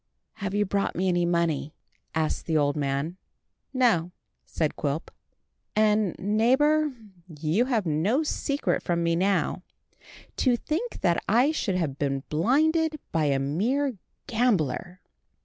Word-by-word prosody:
"Have 200 -1 -3
you 205 0 +2
brought 200 +1 -1
me 185 +2 +1
any 175 -1 +2
money?" 165 -3 0 0.4
asked 160 -1 -1
the 160 -2 +2
old 145 -1 +2
man. 145 +4 -2 0.5
"No," 225 -10 +2 0.4
said 155 -3 -1
Quilp; 145 +2 -3 0.6
"and, 215 -3 +3
neighbour, 265 +10 +3 0.5
you 165 +10 +2
have 235 -6 0
no 180 - +1
secret 285 -1 -1
from 170 -1 -1
me 170 0 +2
now. 185 -1 +1 0.8
To 250 -3 +3
think 340 - -3
that 170 -1 +2
I 245 +8 +4
should 215 -11 -1
have 150 -6 -2
been 135 -2 -1
blinded 305 - +2
by 160 -2 +1
a 140 -2 +2
mere 225 - 0 0.3
gambler!" 185 - 0
185 Hz, 130 wpm, -26 LUFS, 160-245 Hz, 0.8 s, I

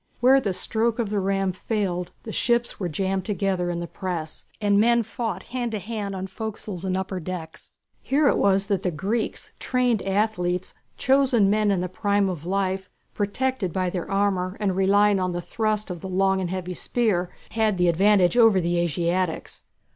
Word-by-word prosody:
Where 265 +2 +5
the 205 - -1
stroke 225 +4 0
of 225 -4 -2
the 210 - +1
ram 195 0 0
failed, 185 -2 -2
the 220 - -6
ships 235 +1 0
were 180 -3 -2
jammed 190 +4 -1
together 190 -3 -1
in 170 0 -2
the - - -3
press, 170 -3 -5
and 205 -2 +3
men 235 +2 +4
fought 225 -3 -5
hand 245 -2 -1
to - - 0
hand 205 0 -4
on 190 0 -4
forecastles 205 -2 -6
and 185 -1 -1
upper 190 0 -3
decks. 165 -2 -7 0.3
Here 285 +2 +2
it - - +3
was 195 0 +3
that 200 -3 0
the 185 - 0
Greeks, 200 +8 -3
trained 250 -4 +1
athletes, 190 -3 0 0.2
chosen 260 -7 +3
men 215 0 +2
in 195 -3 +1
the 180 - -1
prime 200 +2 +1
of 170 -3 -5
life, 190 0 -1 0.2
protected 210 -1 -1
by 185 +1 -1
their 180 -2 -4
armour 195 -1 0
and 195 -3 0
relying 200 +1 +4
on 185 -1 -1
the 175 - -2
thrust 215 +1 -1
of 175 -2 -6
the 190 - -6
long 190 +1 +2
and 180 - -2
heavy 185 0 -4
spear, 185 -2 0 0.2
had 220 -3 +1
the 180 0 +3
advantage 190 +3 +4
over 225 -5 +6
the 175 0 0
Asiatics. 170 +1 -1
195 Hz, 185 wpm, -24 LUFS, 180-215 Hz, 0.3 s, over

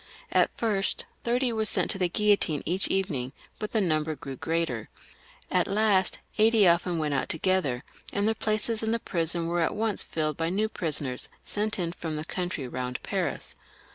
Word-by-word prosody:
At - - +4
first 205 -4 0 0.2
thirty 245 +1 +1
were 220 -1 0
sent - - +4
to 195 - -1
the 180 -2 +2
guillotine 200 -7 +2
each 185 +4 0
evening, 145 -10 -1 0.3
but 215 - -4
the 225 - +2
number 155 -4 +1
grew 135 -2 -7
greater. 160 -7 -2 0.6
At - - +3
last 200 -2 +3 0.2
eighty 220 -2 +6
often 170 0 +3
went 150 -2 0
out 135 - -1
together, 160 -8 +1 0.3
and 200 +1 +1
their 220 - +3
places 215 0 -1
in 220 - -1
^ba 230 0 -1
prison 170 0 +1
were 170 +1 0
at 165 - +1
once 220 -2 +1
filled 155 -2 -2
by 165 0 0
new 210 +4 0
prisoners 145 -9 -2 0.2
sent 210 +1 -1
in 170 -3 -1
from 165 -2 -5
the 155 +1 -3
country 175 -7 -3
round 125 0 -4
Paris. - - -2
180 Hz, 180 wpm, -27 LUFS, 155-210 Hz, 0.6 s, eighty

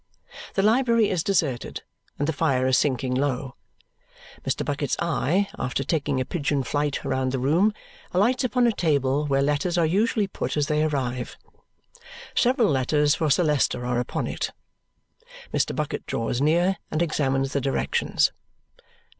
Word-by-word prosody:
The 195 - +2
library 230 0 +3
is 175 -4 0
deserted, 155 -11 -1 0.3
and 145 - -1
the 160 - 0
fire 140 -4 +1
is 130 0 +3
sinking 130 -2 +1
low. 130 -1 -1 0.9
Mr. - - -2
Bucket's 145 -2 -1
eye, 170 +3 +1
after 125 +2 -1
taking 140 -2 -1
a 130 - -1
pigeon 145 -4 -1
flight 145 +2 -2
round 130 0 0
the 135 - -1
room, 160 +11 +3 0.4
alights 235 +9 +2
upon 250 0 +2
a 235 - +4
table 145 - +1
where 135 -1 +2
letters 150 +5 0
are 170 - +3
usually 205 +5 +1
put 195 - -4
as 145 - +2
they 150 +1 +1
arrive. 130 -5 -2 1.0
Several 245 -2 +3
letters 145 +2 +2
for 160 -2 0
Sir 145 +6 +3
Leicester 145 -5 +1
are 125 -1 0
upon 125 - -2
it. - - -3 1.0
Mr. - - 0
Bucket - - -3
draws 115 +2 -2
near 175 +5 +2
and 155 +2 0
examines 135 -4 0
the 140 - 0
directions. 135 +1 +1
145 Hz, 155 wpm, -25 LUFS, 135-175 Hz, 1.0 s, a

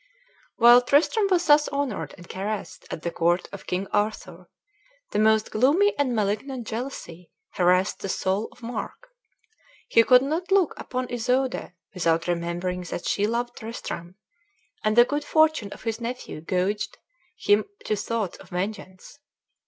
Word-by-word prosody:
While 240 +1 +8
Tristram 315 - +3
was 360 -2 +2
thus 295 -1 +5
honored 280 -6 -3
and 175 -2 -13
caressed 205 +2 -5
at 165 - -6
the 170 - -2
court 175 +2 +1
of 200 - -10
King 185 +2 -1
Arthur, 185 -4 -2 0.6
the - - 0
most 220 0 +3
gloomy 305 - +3
and 270 -4 0
malignant 220 +5 -2
jealousy 220 -8 -6 0.2
harassed 180 +2 +2
the 195 - -5
soul 190 +4 -1
of 245 - -20
Mark. 245 - -6 0.8
He 230 - +6
could 250 +2 +6
not 330 +7 -2
look 385 -5 +4
upon 255 0 -4
Isoude 250 -2 -1 0.2
without 165 -3 +1
remembering 175 +1 -2
that - - -5
she 205 +1 +1
loved 240 +2 -2
Tristram, 185 -6 -7 0.7
and 215 0 +2
the 240 0 +8
good 290 +3 -2
fortune 315 -9 +2
of - - -10
his 225 0 -3
nephew 240 -9 -5
goaded 185 +5 -1 0.4
him 410 0 +3 0.2
to 215 - +1
thoughts 210 -1 -3
of - - -15
vengeance. 185 +5 -6
220 Hz, 150 wpm, -25 LUFS, 185-260 Hz, 0.8 s, While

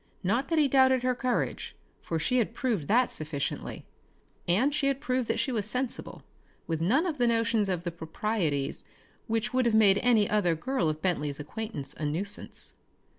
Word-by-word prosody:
Not 235 +9 +1
that 325 - 0
he 300 -2 +5
doubted 260 -1 +4
her 255 0 +2
courage, 250 -1 -2 0.3
for 165 - -2
she 250 +11 +1
had 230 0 -1
proved 220 - -1
that 245 +3 +3
sufficiently; 155 -2 -4 0.6
and 240 +12 +3
she 295 -1 +1
had 275 -1 +1
proved 255 -4 -1
that - - 0
she 270 - 0
was 215 -4 -1
sensible, 250 +3 -3 0.4
with 160 -1 -2
none 255 - +3
of 315 -6 -3
the 240 - +3
notions 230 -3 +2
of 180 -2 -1
the 175 - -3
proprieties 160 -3 -2 0.4
which 225 0 -1
would 255 -1 +3
have 225 - +2
made 205 -3 +6
any 225 -4 +4
other 190 -6 +2
girl 245 -2 0
of 155 0 -4
Bentley's 150 -6 -1
acquaintance 150 -3 -5
a 155 - -5
nuisance. 190 +7 -3
220 Hz, 180 wpm, -28 LUFS, 170-255 Hz, 0.6 s, made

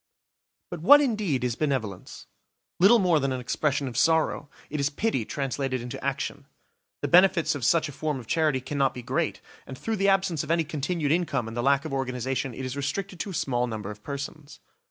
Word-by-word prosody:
But 175 -3 -5
what 290 - +8
indeed 210 - 0
is 125 -2 0
benevolence? 125 -11 -3 0.5
Little 200 +7 +7
more 180 -7 +3
than 135 -1 -1
an 130 - -2
expression 140 +3 -1
of 120 - -6
sorrow; 150 +2 +2 0.2
it 150 - -2
is 140 0 +1
pity 145 - -1
translated 135 -1 -2
into 120 0 -7
action. - - -3 0.6
The - - +1
benefits 180 -1 +5
of 145 -4 -5
such 165 +7 +3
a - - -7
form 150 0 -3
of 120 - -10
charity 150 0 +1
cannot 135 0 0
be 125 - -7
great, - - -1 0.3
and 130 - -8
through 225 +7 -2
the 195 +1 +3
absence 190 -6 +1
of 155 - -9
any 165 0 +2
continued 150 0 -2
income 160 -8 0
and 115 - -7
the 120 - -1
lack 140 +2 +2
of - - -5
organisation 130 -1 -2
it 130 - -5
is 130 +1 -4
restricted 175 +7 -3
to 200 - -3
a - - -6
small 125 -4 0
number 110 -3 -5
of 105 0 -11
persons. 140 +3 -7
140 Hz, 205 wpm, -26 LUFS, 130-165 Hz, 0.6 s, what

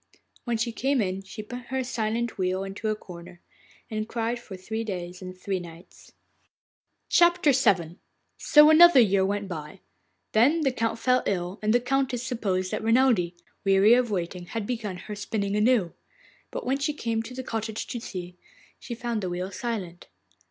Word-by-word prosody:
When 240 -2 0
she 230 +1 -1
came 270 +4 0
in 190 -2 -1
she 210 +3 -9
put 245 +3 -8
her 265 0 -1
silent 230 -1 -2
wheel 185 +1 0
into 200 +2 -5
a 215 - +1
corner, 175 -3 -12 0.5
and 215 0 -4
cried 235 +1 -2
for 200 -5 -10
three 220 +5 -4
days 180 -3 -6
and 185 0 -8
three 190 0 -2
nights. 170 0 -13 1.0
VII 345 -4 +5 0.9
So 300 0 +7
another 345 -2 +8
year 200 -4 +4
went 200 +1 -1
by. 165 +1 -7 0.5
Then 280 +10 +4
the 270 -3 +2
Count 230 -2 -1
fell 255 +2 +2
ill, 180 0 -2
and 215 0 +1
the 240 - +4
Countess 255 -1 -1
supposed 195 -7 -2
that - - -2
Renelde, 225 -6 +3 0.3
weary 195 +3 +5
of 245 -1 +3
waiting, 180 -2 -3
had 225 +1 -4
begun 215 -5 -4
her 210 +4 -8
spinning 205 -1 -2
anew; 210 -5 +2 0.6
but - - -6
when 265 +2 0
she 300 +2 0
came 230 -5 -1
to 235 +3 -9
the 260 - -5
cottage 220 -2 -4
to 240 - -5
see, 180 -5 -7 0.4
she 235 - -6
found 235 -2 -3
the 185 - -3
wheel 180 +2 -4
silent. 190 -5 -5
215 Hz, 175 wpm, -26 LUFS, 185-245 Hz, 1.0 s, another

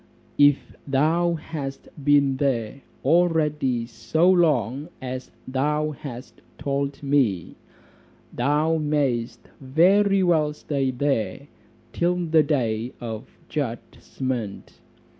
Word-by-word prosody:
If 145 -1 +4
thou 160 +5 +2
hast 150 -4 -6 0.2
been 140 -2 +4
there 130 -3 -1 0.2
already 150 -6 +2
so 155 +9 0
long 150 - +2
as 130 -1 -6 0.2
thou 150 +4 0
hast 135 -4 -9 0.2
told 140 0 -2
me, 130 - +1 0.8
thou 150 +6 +1
may'st 130 -6 -1
very 190 +8 +3
well 155 -4 +2
stay 140 -3 -2
there 130 -3 -1 0.5
till 175 +1 +1
the 165 -3 +3
day 125 -6 -1
of 110 -2 -6 0.2
judgment. 125 -4 -5
140 Hz, 95 wpm, -24 LUFS, 125-155 Hz, 0.8 s, If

